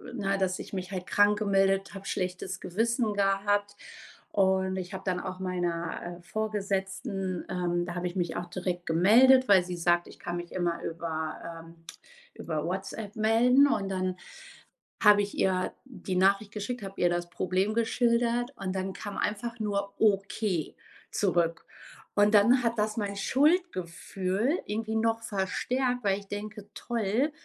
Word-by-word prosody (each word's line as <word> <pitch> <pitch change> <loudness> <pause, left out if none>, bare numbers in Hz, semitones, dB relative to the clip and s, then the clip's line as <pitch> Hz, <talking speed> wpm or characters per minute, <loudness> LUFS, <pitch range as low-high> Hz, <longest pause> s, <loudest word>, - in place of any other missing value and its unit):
Na, 195 -3 0
dass 185 -1 0
ich - - -9
mich 185 0 -4
halt 185 -2 -4
krank 205 0 +4
gemeldet 195 -1 +2
habe 195 0 -8
schlechtes 180 0 -3
Gewissen 225 +3 0
gehabt 205 +1 +1 0.6
und 190 -1 +2
ich 185 +1 -5
habe 190 - -7
dann 180 -1 0
auch 185 0 -5
meiner, 175 -1 -3
äh, - - -16
Vorgesetzten, 195 -2 -3
ähm 175 -1 -1
da 175 - -5
habe 175 0 -2
ich 175 - -6
mich 175 -2 -1
auch 175 - -4
direkt 180 0 -4
gemeldet, 240 +10 +6
weil 190 -3 +6
sie 180 -1 -5
sagt: 175 0 +2
„Ich - - -13
kann 175 0 -4
mich 175 0 -7
immer 175 -2 -1
über, 160 -1 -4 0.3
ähm 165 - -14 0.6
über 155 0 -4
WhatsApp 195 +4 -4
melden.“ 240 +6 +5
Und 205 -7 0
dann 185 -1 -1 0.9
habe 210 -1 +7
ich 205 - -4
ihr 185 -1 +1
die 195 -7 -5
Nachricht 200 +2 +3
geschickt, 220 +2 -4
habe 195 0 -8
ihr 175 - +4
das 175 0 -2
Problem 190 +4 0
geschildert 235 +2 +1
und 190 -1 -4
dann 190 0 -2
kam 205 -2 -7
einfach 230 +3 -2
nur 200 -2 -2
„Okay“ 195 -4 +1 0.3
zurück. 170 -4 0 0.5
Und 205 +1 +4
dann 240 +5 +5
hat 230 0 0
das 215 +1 0
mein 200 -2 -2
Schuldgefühl 215 - 0
irgendwie 220 +1 -2
noch 225 0 +1
verstärkt, 245 +5 -1
weil 195 -1 +1
ich 200 - -15
denke: 210 0 -7
„Toll, 235 +5 -1
195 Hz, 155 wpm, -29 LUFS, 180-215 Hz, 0.9 s, habe